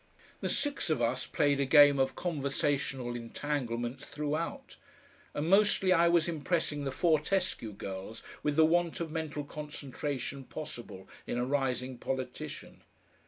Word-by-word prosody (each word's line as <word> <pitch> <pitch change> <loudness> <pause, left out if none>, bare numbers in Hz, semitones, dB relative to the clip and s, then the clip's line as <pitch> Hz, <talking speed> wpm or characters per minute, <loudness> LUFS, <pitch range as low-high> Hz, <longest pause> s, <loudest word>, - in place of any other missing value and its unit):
The - - -2
six 290 - -1
of 155 - +2
us 120 +2 0
played 145 -2 +2
a 140 - +2
game 145 -1 +7
of 135 0 +1
conversational 140 -5 -1
entanglements 120 0 -3
throughout, 160 - -3 0.6
and 150 +2 -1
mostly 195 -1 +5
I 170 -1 +5
was 170 -1 +4
impressing 155 -2 -1
the 135 - -1
Fortescue 165 - +1
girls 95 +2 -7 0.2
with 150 -1 0
the 160 +1 +6
want 170 +1 +2
of 165 -2 -3
mental 155 -2 -3
concentration 145 -2 -5
possible 120 -11 -8 0.2
in - - -2
a 120 - +1
rising 130 -2 -1
politician. 130 -1 -5
145 Hz, 135 wpm, -31 LUFS, 130-160 Hz, 0.6 s, game